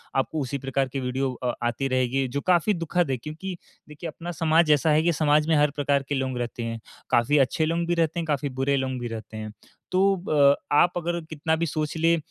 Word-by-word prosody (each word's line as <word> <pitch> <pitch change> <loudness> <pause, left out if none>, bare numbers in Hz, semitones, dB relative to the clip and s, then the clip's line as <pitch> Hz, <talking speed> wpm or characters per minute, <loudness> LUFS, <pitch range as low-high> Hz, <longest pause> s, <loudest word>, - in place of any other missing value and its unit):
आपको 135 +4 0
उसी 140 +1 -3
प्रकार 135 0 -1
की 135 +1 -4
वीडियो 130 +1 -1
अ, 125 -1 0
आती 125 +3 -1
रहेगी, 130 +1 +1
जो 140 +3 -3
काफ़ी 180 +3 +3
दुखद 170 -3 0
है, 130 - 0
क्योंकि 160 +8 -7 0.3
देखिए, 150 +3 -7
अपना 170 +3 -7
समाज 165 -1 +3
ऐसा 150 +2 +3
है 155 +1 +3
कि 170 0 +2
समाज 150 0 +2
में 160 - +4
हर 150 0 +3
प्रकार 140 -1 +1
के 145 - 0
लोग 130 -2 -2
रहते 120 0 -4
हैं। 115 0 -4 0.3
काफ़ी 120 +5 +3
अच्छे 140 +4 +2
लोग 165 +2 0
भी 175 - +1
रहते 165 0 0
हैं, 170 - -2
काफ़ी 145 -2 -1
बुरे 140 +1 +2
लोग 130 -1 -2
भी 120 - -4
रहते 110 -1 -7
हैं। 110 0 -6 0.4
तो 185 - +2 0.3
ब 140 -2 +5 0.2
आप 175 +4 +5
अगर 170 0 -2
कितना 160 +1 0
भी 165 +1 -1
सोच 155 -1 -3
लें 165 +1 +3
145 Hz, 230 wpm, -25 LUFS, 130-165 Hz, 0.4 s, ब